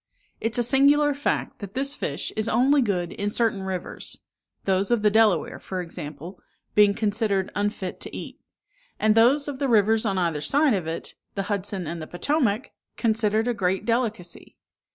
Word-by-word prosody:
It 225 - -2
is - - 0
a 240 - +2
singular 285 +4 +4
fact, 285 +1 -2
that 200 0 -8
this 275 +2 0
fish - - -3
is 215 +1 0
only 275 +4 +4
good 180 -7 -1
in 205 -2 -2
certain 220 -2 +1
rivers: 190 -1 -5 0.5
those 195 0 +1
of 240 -3 +1
the 210 - +4
Delaware, 220 -3 +2
for 185 - -5
example, 165 +1 -7 0.3
being 205 -1 +5
considered 205 -3 0
unfit 205 -3 -3
to - - -6
eat; - - -8 0.6
and 215 0 +4
those 255 +6 +4
of 280 -2 -5
the 275 -2 0
rivers 220 0 +4
on 195 -4 0
either 165 -5 0
side 280 - +2
of 185 -6 -2
it, 165 +1 -5 0.2
the 195 - -1
Hudson 195 -2 -3
and 165 +1 -5
the 155 - -7
Potomac, 245 - 0 0.3
considered 220 -1 +1
a 245 - +1
great 190 -3 -1
delicacy. 225 -7 -2
210 Hz, 175 wpm, -25 LUFS, 190-240 Hz, 0.6 s, being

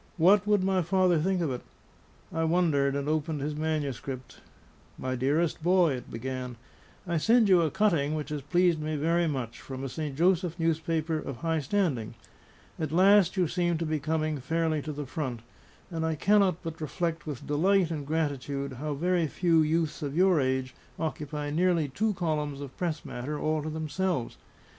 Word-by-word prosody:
What 195 +4 +5
would 205 -2 +3
my 190 -1 +2
father 180 -1 +3
think 185 +3 +1
of 160 -5 0
it? 125 - -4 0.7
I 165 0 0
wondered, 160 -5 +2
and 140 0 -2
opened 155 0 -1
his 150 +2 -3
manuscript. 140 -5 -3 0.6
"My 130 0 -2
dearest 145 +7 0
boy," 175 -2 +4
it 125 - -7
began, 125 +1 -5 0.5
"I 170 -2 0
send 225 +7 +4
you 185 -3 +6
a 160 - +2
cutting 155 -7 +1
which 150 -1 -4
has 150 -1 -3
pleased 175 +3 +2
me 155 0 -2
very 165 +3 +1
much, 130 -6 -4
from 130 0 -7
a 135 - -3
St. 150 0 -4
Joseph 175 +1 +2 0.3
paper 160 -1 0
of 140 -4 -6
high 165 +1 0
standing. 140 - -1 0.6
At 155 -2 -2
last 190 +2 +5
you 180 -2 +3
seem 175 0 0
to 165 - -2
be 155 -1 -1
coming 155 0 -1
fairly 160 +3 0
to 155 - -5
the 145 0 -5
front; 130 -4 -4 0.5
and 165 -1 -2
I 160 -1 0
cannot 195 +1 +3
but 165 -1 -6
reflect 165 +1 -3
with 145 -5 -5
delight 175 +4 +2
and 145 -3 -4
gratitude 140 -3 -2
how 150 -1 -2
very 175 +2 +1
few 165 +1 +2
youths 160 0 0
of 145 +1 -3
your 185 -3 +5
age 130 0 -1 0.2
occupy 150 -2 -3
nearly 170 -1 +2
two 210 +9 0
columns 150 -5 -2
of 140 -2 -8
press 165 -4 -3
matter 140 +5 -4
all 155 0 0
to 155 - -4
themselves. 155 -2 -2
155 Hz, 180 wpm, -28 LUFS, 145-175 Hz, 0.7 s, you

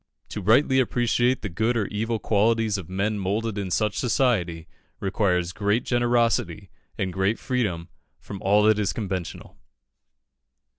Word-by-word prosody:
To 105 - -5
rightly 130 +7 +4
appreciate 120 0 +1
the - - -1
good 110 +8 0
or 105 - 0
evil 110 +2 -2
qualities 110 0 +1
of 90 - -10
men 100 +3 -1
moulded 105 +3 -2
in 95 -2 -3
such 105 +3 0
society, 100 -11 0 0.3
requires 90 -3 0
great 105 +4 0
generosity, 120 -5 0 0.3
and 95 -2 -2
great 95 +4 0
freedom 105 -11 -2 0.3
from 100 -2 -9
all 105 +2 +3
that 110 0 +4
is 100 - 0
conventional. 95 -6 -5
105 Hz, 140 wpm, -24 LUFS, 95-115 Hz, 0.3 s, rightly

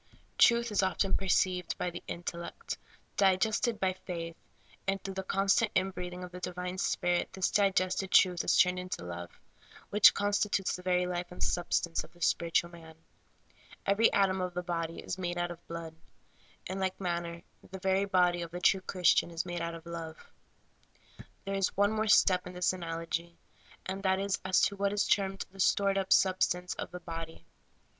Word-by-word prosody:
Truth 235 -1 +5
is 205 -1 +2 0.3
perceived 185 -2 +1
by 180 - -2
the 175 - -7
intellect, 170 - -6 0.4
digested 210 +4 +2
by 190 -2 +2
the 185 - -22
faith, 165 -2 -6 0.5
and 195 0 +1
through 195 - -5
the 190 - -3
constant 195 +3 +2
in 190 +1 +2
breathing 180 0 -6
of 180 - -8
the 180 - -8
divine 180 +1 -4
Spirit 175 -2 0
this 190 -1 0
digested 195 -1 +1
truth 180 -3 +4
is - - +2
turned 180 0 +4
into 180 - -5
love, 85 0 -8 0.5
which 210 0 +7
consti 205 +1 +1
tutes 195 -1 0
the 180 - -8
very 180 0 +1
life 180 0 -4
and 180 - -4
substance 170 -1 0
of - - -15
the 175 - -21
spiritual 170 +1 +1
man. 165 -2 -13 0.9
Every 200 +3 +4
atom 190 -1 +2
of 180 -1 -3
the 180 - -2
body 165 -1 -3
is 185 - -5
made 175 -1 -2
out 175 0 -1
of 170 0 -12
blood. 165 -1 -7 0.7
In 190 +1 -4
like 190 -1 -2
manner 170 -2 -3 0.3
the 190 - -7
very 190 +1 +1
body 180 -2 +2
of 170 - -5
the 175 +2 -6
true 190 +1 +3
Christian 180 -2 +2
life 170 - -12
is 165 - -2
made 175 -1 -4
out 170 0 -3
of 165 0 -11
love. 165 -1 -6 1.3
There 195 - -3
is 195 -1 0
one 205 +1 +4
more 220 0 0
step 185 -3 +4
in 180 - -8
this 180 +1 +1
analogy, 170 -1 -4 0.5
and 190 +1 -4
that 190 -1 +2
is 200 0 -1
as 190 0 +3
to 200 - +2
what 200 0 0
is 205 - +1
termed 195 0 +1
the 195 - -16
stored 195 +1 +3
up 190 0 -4
substance 180 -1 +3
of - - -6
the 180 0 -8
body. 165 -1 -7
180 Hz, 190 wpm, -31 LUFS, 175-195 Hz, 1.3 s, which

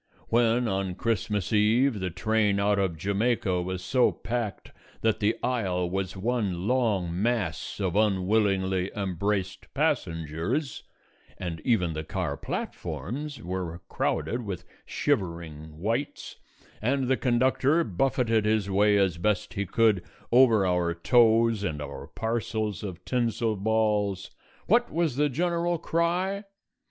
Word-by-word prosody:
When, 120 +1 +3
on 95 -2 -1
Christmas 105 -1 -1
Eve, 110 +3 +3
the 95 -1 -2
train 105 +3 +1
out 100 0 +2
of 95 -4 0
Jamaica 100 0 0
was 90 0 -4
so 125 +6 +3
packed 115 -4 -4 0.3
that 110 -1 +1
the 105 +1 +2
aisle 95 -8 0
was 95 0 -2
one 100 -4 -1
long 100 -9 +1
mass 105 -9 -1
of 95 -3 -1
unwillingly 95 -2 +2
embraced 100 0 -2
passengers, 80 - -1 0.6
and 85 -3 -5
even 90 -9 +2
the 80 0 -4
car 80 - -3
platforms 140 - -5
were 90 -1 -4
crowded 120 +1 -1
with 95 -4 -5 0.2
shivering 80 -4 -2
wights, 115 - -3 0.4
and 130 +3 +1
the 130 - +3
conductor 130 +6 +2
buffeted 115 - +1
his 105 -2 +1
way 105 +1 +4
as 95 -4 +1
best 105 +3 0
he 100 -1 -2
could 110 -2 +3 0.3
over 115 -5 +6
our 90 -2 +1
toes 115 +2 +4
and 75 -7 -2
our 70 -1 -7
parcels 110 -2 -2
of 90 -4 -7
tinsel 115 -3 0
balls, 105 -2 0 0.3
what 240 +4 +3
was 165 -5 0
the 145 +2 +2
general 170 +4 0
cry? 180 +5 0
105 Hz, 125 wpm, -27 LUFS, 95-120 Hz, 0.6 s, over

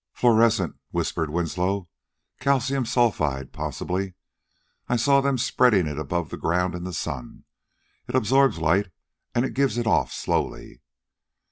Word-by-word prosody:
"Fluorescent," 115 -6 +3
whispered 80 -2 -2
Winslow. 90 +4 -1 0.5
"Calcium 135 -2 +1
sulphide, 80 - 0
possibly; 95 0 -3 0.7
I 120 - +2
saw 140 +4 +4
them 140 -1 +1
spreading 115 -6 +3
it 75 -1 -4
above 80 +2 -2
ground 90 +2 0
in 90 0 -5
the 90 - -4
sun. 70 -7 -5 0.6
It - - -4
absorbs 135 +1 +3
light 85 +5 +2 0.5
and 120 +2 +1
gives 135 -2 +1
it 120 - -1
off 110 - +2
slowly." - - -3
100 Hz, 125 wpm, -24 LUFS, 85-125 Hz, 0.7 s, saw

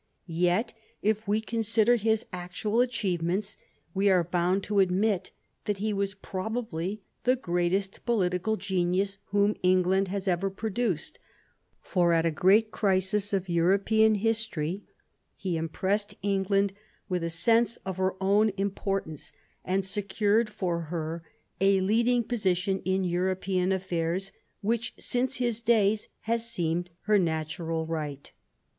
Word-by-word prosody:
Yet, 180 +5 +1 0.3
if 215 0 0
we 210 +2 +2
consider 225 +1 +2
his 220 -1 +1
actual 185 +6 -1
achievements, 195 -5 -1 0.4
we 200 +1 +3
are 185 -2 +4
bound 180 +3 0
to 205 0 0
admit 190 0 +2 0.4
that 205 -1 -1
he 210 +2 -1
was 200 0 -1
probably 195 -1 -4 0.2
the 255 +1 +4
greatest 185 -2 -1
pohtical 210 -2 +1
genius 190 +1 0
whom 205 +1 +2
England 185 +1 +3
has 195 +1 -4
ever 185 +1 +1
produced; 215 - -2 0.6
for 175 -3 +2
at 165 0 +3
a 165 - +2
great 205 +7 +4
crisis 195 +1 +1
of 195 -2 0
European 200 +6 +3
history 205 -5 -1 0.5
he 185 -3 -3
impressed 190 +6 -1
England 195 0 +1 0.3
with 180 -3 -1
a 170 - -1
sense 230 +8 +3
of 190 -1 -4
her 185 0 0
own 200 +3 +3
importance, 195 -5 -3 0.3
and 190 +1 0
secured 205 +2 +1
for 180 -5 -2
her 165 0 -3 0.4
a 195 +1 +4
leading 235 +5 +2
position 190 -4 0
in 190 0 +1
European 185 +1 0
affairs, 185 0 -1 0.3
which 230 +3 -1
since 250 +1 -1
his 240 -2 -1
days 220 -3 +2
has 230 +1 -1
seemed 175 -4 -1
her 210 -1 +3
natural 160 -1 -2
right. 150 -4 -5
195 Hz, 130 wpm, -28 LUFS, 180-215 Hz, 0.6 s, are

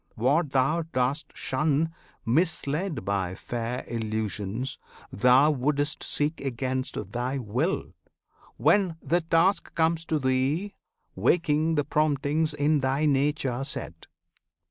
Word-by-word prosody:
What 140 +8 +2
thou 135 +5 +2
dost 145 -2 -1
shun, 155 +3 0 0.3
Misled 155 - 0
by 95 -2 -1
fair 120 +4 -4
illusions, 110 +1 -3 0.3
thou 125 +7 +5
wouldst 145 +1 0
seek 150 +2 -1
Against 130 0 -3
thy 125 +2 -2
will, 130 - -2 0.6
when 190 -5 +3
the 175 +1 +1
task 165 +4 +1
comes 165 0 +2
to 160 - 0
thee 140 +9 0 0.4
Waking 160 -1 +2
the 145 - +2
promptings 150 +1 +1
in 150 +1 +2
thy 135 +3 +1
nature 140 -3 +1
set. 85 - -5
140 Hz, 110 wpm, -27 LUFS, 125-160 Hz, 0.6 s, thou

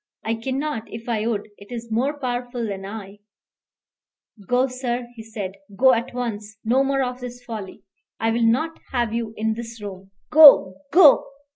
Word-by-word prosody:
I 225 - 0
cannot, 260 +1 -3
if 225 +1 -8
I 225 -2 -1
would. 215 -3 -2
It 200 +4 -14
is 235 -1 -7
more 270 +6 0
powerful 245 -2 -3
than 195 -1 -5
I 205 -1 -9 0.6
" 200 -5 -26
"Go, 250 +1 +3
sir," 250 -2 -3
he 225 - -9
said; 215 -4 -6 0.3
"go 260 +3 +6
at 235 +2 -1
once; 220 -4 -5
no 255 +4 +3
more 275 0 +1
of 250 0 -4
this 245 0 -8
folly. 215 -5 -8 0.4
I 225 - +1
will 235 +1 0
not 260 +9 +1
have 240 -3 0
you 230 -1 -3
in 220 0 0
this 230 0 -8
room: 195 -2 -9 0.2
Go 290 -11 +9 0.2
go!" 320 -2 +7
235 Hz, 175 wpm, -23 LUFS, 220-250 Hz, 0.6 s, Go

